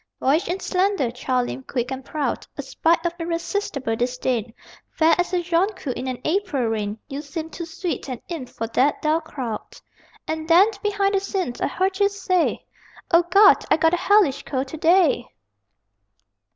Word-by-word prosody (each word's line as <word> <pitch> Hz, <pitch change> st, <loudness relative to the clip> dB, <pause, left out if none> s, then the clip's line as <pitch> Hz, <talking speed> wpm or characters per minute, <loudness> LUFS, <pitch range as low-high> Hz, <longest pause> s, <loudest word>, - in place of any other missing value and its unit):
Boyish 300 Hz, +8 st, +2 dB
and 360 Hz, +2 st, -2 dB
slender, 375 Hz, -, 0 dB
child 250 Hz, 0 st, -1 dB
limbed, 265 Hz, -, -7 dB
quick 245 Hz, 0 st, -2 dB
and 265 Hz, 0 st, -5 dB
proud, 285 Hz, -4 st, -3 dB
A 285 Hz, -, -4 dB
sprite 330 Hz, +5 st, +1 dB
of 345 Hz, -, 0 dB
irresistible 335 Hz, -, -2 dB
disdain, 245 Hz, -1 st, -1 dB, 0.4 s
Fair 320 Hz, 0 st, +3 dB
as 355 Hz, -, 0 dB
a 360 Hz, -1 st, 0 dB
jonquil 345 Hz, -4 st, 0 dB
in 255 Hz, -, -5 dB
an 255 Hz, -1 st, -3 dB
April 320 Hz, -6 st, 0 dB
rain, 210 Hz, -1 st, -2 dB
You 280 Hz, 0 st, -5 dB
seemed 315 Hz, +2 st, -6 dB
too 340 Hz, -, -6 dB
sweet 335 Hz, -3 st, -4 dB
an 250 Hz, -2 st, -4 dB
imp 320 Hz, -8 st, -6 dB
for 225 Hz, -, -4 dB
that 260 Hz, +5 st, +1 dB
dull 310 Hz, +2 st, +2 dB
crowd.... 260 Hz, -8 st, -6 dB, 0.5 s
And 315 Hz, 0 st, -3 dB
then, 365 Hz, +6 st, +6 dB
behind 405 Hz, -1 st, +1 dB
the 390 Hz, -, +3 dB
scenes, 385 Hz, -, -3 dB
I -, -, +2 dB
heard 380 Hz, +1 st, -1 dB
you 400 Hz, 0 st, +4 dB
say, 375 Hz, -3 st, 0 dB, 0.5 s
"_O 345 Hz, +1 st, +5 dB
Gawd, 400 Hz, +2 st, +6 dB
I -, -, +4 dB
got 325 Hz, +1 st, +3 dB
a -, -, +3 dB
hellish 390 Hz, -7 st, +3 dB
cold 265 Hz, -1 st, -3 dB
to 315 Hz, -, -7 dB
day! 325 Hz, -6 st, +3 dB
320 Hz, 180 wpm, -23 LUFS, 260-365 Hz, 0.5 s, then